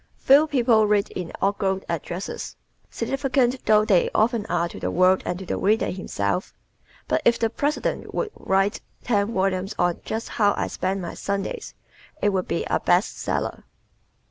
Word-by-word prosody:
Few 285 +4 +5
people 235 -6 +3
read 205 -1 +1
inaugural 190 +2 -1
addresses, 170 +3 -5 0.3
significant 265 -2 0
though 215 0 +5
they 195 -6 +3
often 220 -1 +2
are 175 -1 0
to - - -9
the - - -2
world 185 +1 +4
and 175 - -1
to 190 - -8
the - - -2
reader 215 +3 +2
himself. 180 - -3 0.5
But - - +1
if 235 - +4
the 225 -1 0
President 290 +4 -2
would 435 - -2
write 195 +1 0 0.2
ten 205 -2 +1
volumes 190 -1 -1
on 175 -1 +1
"Just 225 +1 -4
How 205 -3 +2
I - - 0
Spend 190 0 -2
My 170 - -5
Sundays," 200 -1 -4 0.4
it 205 - +2
would 190 -2 -1
be - - -1
a - - 0
"best 180 +4 +2
seller." - - -2
200 Hz, 165 wpm, -24 LUFS, 185-230 Hz, 0.5 s, Few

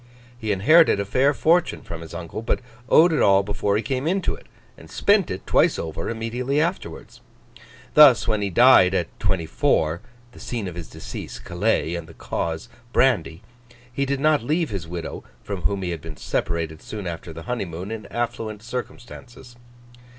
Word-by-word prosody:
He 110 -3 -3
inherited 145 - +5
a 100 - -1
fair 130 +8 +3
fortune 165 +6 +1
from 85 -1 -7
his 85 +1 -9
uncle, 85 +4 -6
but 115 - -1 0.3
owed 165 +1 +6
it 150 - +1
all 100 0 +5
before 100 0 0
he 110 - -2
came 130 +5 -2
into 190 +2 0
it, - - -12 0.3
and - - -15
spent 200 -3 +2
it 95 0 -5
twice - - +3
over 80 0 -4
immediately 120 +5 -2
afterwards. 170 +4 -4 0.7
Thus, 140 -9 +7
when 110 -2 +1
he 100 - -1
died, 95 -3 +6
at 85 -3 -3
twenty 90 -4 0
four 80 +2 +1 0.3
(the - - -15
scene 115 -5 -4
of 90 - -6
his 85 -2 -8
decease, - - -8
Calais, 80 - -1
and 85 -2 -5
the 80 - -14
cause, 80 -1 -4 0.2
brandy), 110 -10 +1 0.5
he 140 +2 -1
did 140 0 -1
not 150 +1 +3
leave 155 +5 -1
his 95 -5 -5
widow, 85 0 -6 0.2
from 100 -3 -5
whom 100 +2 -1
he 90 - -2
had 85 -3 -5
been 80 -1 -9
separated 80 -2 -3
soon 105 -3 -7
after 85 -1 -6
the 80 +1 -9
honeymoon, 95 -5 -4
in 110 -2 -6
affluent 115 -3 -4
circumstances. 120 0 -8
105 Hz, 180 wpm, -23 LUFS, 85-130 Hz, 0.7 s, Thus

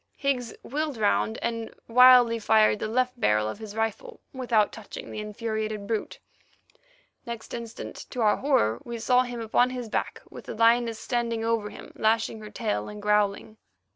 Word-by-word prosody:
Higgs 255 -5 -1
wheeled 295 0 -3
round, 110 - +1
and 230 -1 -3 0.2
wildly 245 -1 +7
fired 215 -1 +4
the - - -2
left 250 +2 0
barrel 105 - +2
of 110 - -5
his 215 -2 -8
rifle 225 - -3
without 240 -5 +1
touching 220 -2 -9
the - - -5
infuriated 215 -1 -4
brute. 220 +1 -3 1.1
Next 235 -2 -7
instant, 235 -1 -7
to 250 - -4
our 210 -2 +4
horror, 120 - +1
we 235 -1 -6
saw 250 +2 +3
him 245 -2 -4
upon 235 +3 +2
his 250 -3 -5
back, - - -2
with - - -11
the - - -6
lioness 230 0 +3
standing 230 -1 -2
over 225 -2 0
him, - - -11
lashing 220 0 +1
her 215 -1 -9
tail, 215 -2 -2
and 210 0 -8
growling. 210 +1 0
225 Hz, 170 wpm, -26 LUFS, 215-245 Hz, 1.1 s, wildly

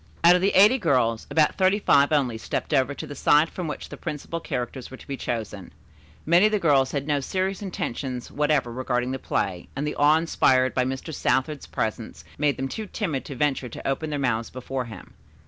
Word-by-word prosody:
Out 170 +1 +8
of 180 - +1
the 195 +2 +1
eighty 215 +7 +6
girls, 125 - +1
about 155 -2 +3
thirty 190 +1 +4
five 140 -8 +4
only 135 -6 +1
stepped 110 - -4
over 135 0 +2
to - - -6
the - - -8
side 150 +3 +3
from 180 -3 -5
which 150 - -6
the - - -8
principal 150 +3 -5
characters 125 -3 -5
were 130 - -10
to - - -16
be 140 - -3
chosen. 110 -7 -5 0.5
Many 175 +6 +5
of - - -2
the 215 - +2
girls 140 -8 +3
had 140 -1 -2
no 145 -1 +1
serious 190 +7 -2
intentions 130 - -4
whatever 145 -4 +1
regarding 125 0 -1
the 130 - -3
play, 90 -7 -2
and 140 +2 -2
the 150 - -2
awe 150 +2 +4
inspired 130 -5 +2
by 125 - +1
Mr. 130 +5 -4
Southard's 140 +1 -1
presence 110 +1 -4 0.2
made 145 -1 +1
them 135 - -2
too 215 +10 -6
timid 165 - -3
to 140 - -7
venture 135 -2 0
to - - -7
open 145 +3 -1
their 150 - -2
mouths 120 -4 -1
before 130 0 -4
him. 110 -6 -11
140 Hz, 215 wpm, -25 LUFS, 130-160 Hz, 0.5 s, Out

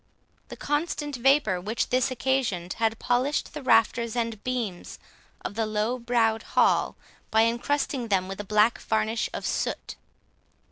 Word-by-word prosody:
The - - -9
constant 295 -1 -2
vapour 250 -7 +3
which 215 +5 -2
this 255 +1 +2
occasioned, 250 -9 -1
had 225 0 +1
polished 250 +5 0
the 300 - -6
rafters 235 -1 +2
and 230 -3 -2
beams 235 -8 -4 0.5
of - - -3
the 220 +1 -1
low 215 +4 -1
browed 230 -2 +1
hall, - - +2 0.3
by 220 0 +4
encrusting 245 +2 0
them 190 -3 +1
with 195 +1 -7
a - - -3
black 210 +3 +3
varnish 220 +1 0
of - - -5
soot. - - -2
230 Hz, 145 wpm, -26 LUFS, 215-255 Hz, 0.5 s, by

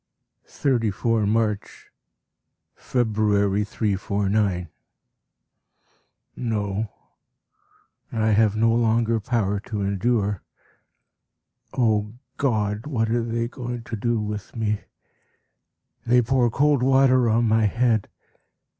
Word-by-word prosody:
34 115 -4 0
March. 105 -1 -2 0.8
February, 105 -4 +1
349. 100 -3 -1 1.7
No, 105 -2 -2 1.2
I 110 -1 +1
have 105 0 +3
no 115 +1 +3
longer 115 0 +2
power 105 -3 -1
to 105 0 -5
endure. 100 0 0 1.4
O 110 -3 +1 0.2
God! 110 -3 -1
what 115 -6 -1
are 120 0 +1
they 115 0 -2
going 120 -1 -6
to 115 - -5
do 120 +2 0
with 105 -1 -5
me? 105 -2 -1 1.3
They 125 +1 +4
pour 125 0 +2
cold 145 +2 +2
water 130 -2 +4
on 115 +2 +2
my 110 0 +3
head. 115 0 +1
110 Hz, 95 wpm, -24 LUFS, 105-120 Hz, 1.7 s, They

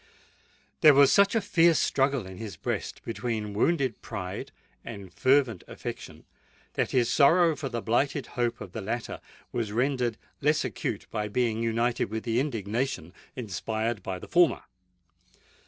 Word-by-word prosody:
There 150 -2 +8
was 140 0 +7
such 200 +2 +5
a 225 - +3
fierce 170 -5 +4
struggle 135 -4 +1
in 95 -1 -9
his 110 -4 -6
breast - - -4
between 115 -3 -3
wounded 130 +1 +1
pride 90 -1 -6 0.3
and 100 -5 -9
fervent 130 -7 +2
affection, - - -8 0.5
that - - 0
his 125 -3 +2
sorrow 165 +4 +5
for 140 -1 -4
the 120 -2 -4
blighted 135 +5 +1
hope 120 -1 -1
of 90 - -8
the 110 - -5
latter 115 +4 -4 0.3
was 110 -3 -2
rendered 125 -1 0 0.2
less 150 0 +2
acute 120 - -3
by 105 -1 -2
being 115 +1 0
united 115 +1 +1
with 110 +2 -5
the 115 0 0
indignation 115 - -2 0.2
inspired 110 0 -3
by 95 0 -4
the - - -10
former. 175 -1 +3
120 Hz, 150 wpm, -28 LUFS, 110-140 Hz, 0.5 s, There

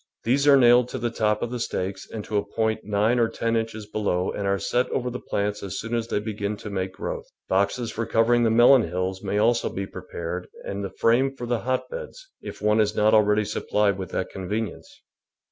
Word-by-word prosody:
These 135 +5 +2
are 140 -1 +8
nailed 120 -1 +6
to - - -4
the 120 -1 -2
top 105 -2 0
of 120 - -3
the 125 - -3
stakes 95 -4 -3
and 110 -2 -6
to 105 - -5
a 100 - +1
point 110 -1 0
nine 105 +4 +1
or 115 -1 +3
ten 115 0 -1
inches 110 -1 -2
be 105 +1 -5
low 90 -3 0
and 100 - -3
are 100 0 +2
set 120 +5 0
over 125 -1 -2
the 125 - -5
plants 105 +1 -2
as 95 -3 -5
soon 115 +1 -5
as 115 -1 -1
they - - -1
begin 105 -1 -3
to 105 - -8
make 95 -1 -3
growth. - - -5 0.2
Boxes 100 +5 0
for 115 0 -3
covering 120 +2 +3
the 115 - +3
melon 120 +3 +7
hills 95 0 -3
may 100 0 -2
also 115 +3 +2
be 95 - -4
prepared 90 -1 -6 0.2
and 100 0 -4
the 100 - -3
frame 125 +7 +2
for 120 - -6
the 120 -1 0
hotbeds, - - -4
if - - -9
one 105 +1 +3
is 105 0 +2
not 105 +1 +3
already 105 0 +4
supplied 105 -1 0
with 95 -2 -5
that - - -3
convenience. 105 +2 -5
110 Hz, 225 wpm, -25 LUFS, 100-120 Hz, 0.2 s, are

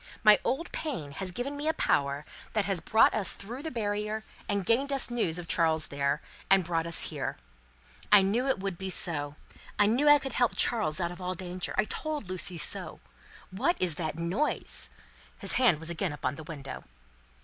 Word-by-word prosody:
My 215 -1 +8
old 300 +7 -2
pain 240 - -4
has 185 +6 -2
given 245 +10 -3
me 290 +2 -4
a 320 - +1
power 140 +1 +1 0.3
that 215 -2 +1
has 195 -2 0
brought 220 - +4
us 210 -3 0
through 235 +7 -7
the 320 - -4
barrier, 210 -2 -2 0.3
and 200 -2 0
gained 270 +7 +2
us 270 -3 +2
news 200 -9 0
of 175 -1 -6
Charles 160 -2 +2
there, 140 +1 -1 0.3
and 195 -1 +5
brought 165 -1 -1
us 170 - +2
here. - - -3 0.7
I 205 -2 +8
knew 230 +7 +1
it 265 - +2
would 195 -2 -4
be 190 0 -4
so; 145 -5 0 0.4
I 205 - +5
knew 250 +8 +3
I 295 - +9
could 270 -2 -6
help 245 -2 +2
Charles 210 -10 +2
out 170 -1 -1
of 175 - -10
all 180 0 -3
danger; 180 0 -5
I 190 - +3
told 300 - -4
Lucie 185 -1 -1
so. - - -1 0.5
What 265 - 0
is 180 -3 +2
that 160 -1 -4
noise?" 180 - -2 0.5
His - - 0
hand 230 -11 +5
was 160 +1 -1
again 170 -1 -2
upon 135 -2 -2
the 160 +2 -9
window. 140 -4 -7
190 Hz, 195 wpm, -29 LUFS, 165-240 Hz, 0.7 s, I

